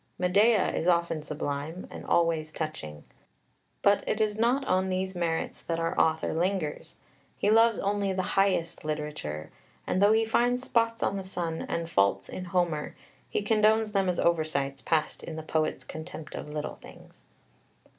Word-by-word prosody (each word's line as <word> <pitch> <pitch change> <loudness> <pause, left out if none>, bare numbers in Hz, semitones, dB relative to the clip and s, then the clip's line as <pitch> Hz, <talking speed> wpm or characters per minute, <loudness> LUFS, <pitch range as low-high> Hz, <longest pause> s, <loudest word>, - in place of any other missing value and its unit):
Medea 200 +4 +3
is 165 - -1
often 170 -2 +2
sublime, 150 +3 -4
and - - -8
always 165 -2 +1
touching. 155 - -5 0.8
But 200 0 +4
it 215 - 0
is 215 -1 +1
not 245 +5 +2
on 185 -2 +1
these 190 0 -1
merits 170 -2 -2
that 165 -1 -2
our 165 0 -1
author 160 0 +2
lingers; 175 -2 -2 0.4
he 205 - +2
loves 225 0 +5
only 200 0 0
the 185 0 -1
highest 190 -4 +1
literature, 150 - -4 0.3
and, 185 - 0
though 205 +2 +6
he 225 0 +3
finds 245 +3 +2
spots 230 -2 +1
on 200 - 0
the 195 - -4
sun 170 -3 -3
and 170 0 -2
faults 100 -9 +2
in 185 - -6
Homer, 175 -4 -1 0.3
he - - -1
condones 215 0 +3
them 195 -2 +1
as 180 - -1
oversights 155 -5 0
passed 155 -2 0
in 160 - -7
the 160 - -6
poet's 155 0 -1
"contempt 160 -1 -8
of - - -6
little 150 0 -4
things." - - -15
175 Hz, 165 wpm, -28 LUFS, 155-200 Hz, 0.8 s, though